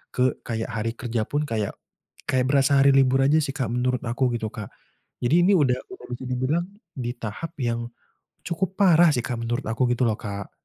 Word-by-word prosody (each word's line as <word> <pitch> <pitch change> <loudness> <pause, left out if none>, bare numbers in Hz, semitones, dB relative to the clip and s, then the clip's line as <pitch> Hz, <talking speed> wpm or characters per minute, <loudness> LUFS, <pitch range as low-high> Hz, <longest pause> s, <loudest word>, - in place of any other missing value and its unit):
ke 125 0 +3 0.2
kayak 115 0 -3
hari 115 0 -2
kerja 115 -2 -2
pun, 145 +1 -1
kayak 110 -5 -2 0.5
kayak 130 -1 +2
berasa 140 0 +4
hari 140 0 +6
libur 135 -1 +4
aja 145 +3 +4
sih 135 - -2
Kak 130 -4 -1
menurut 125 +1 0
aku 125 +2 +1
gitu 115 -2 -2
Kak. 105 -4 -7 0.5
Jadi 165 +8 +4
ini - - +5
udah 135 -6 +3 0.2
udah 380 - -10
bisa 120 +1 -5
dibilang 130 +7 0 0.3
di 120 -5 -4
tahap 115 +10 -5
yang 120 -1 -1 0.6
cukup 185 +2 -2
parah 175 -4 +6
sih 120 - 0
Kak 120 -1 -4
menurut 120 +3 -2
aku 115 +3 +1
gitu 125 - -2
loh, 110 -1 0
Kak. 100 -1 -6
125 Hz, 195 wpm, -24 LUFS, 115-140 Hz, 0.6 s, hari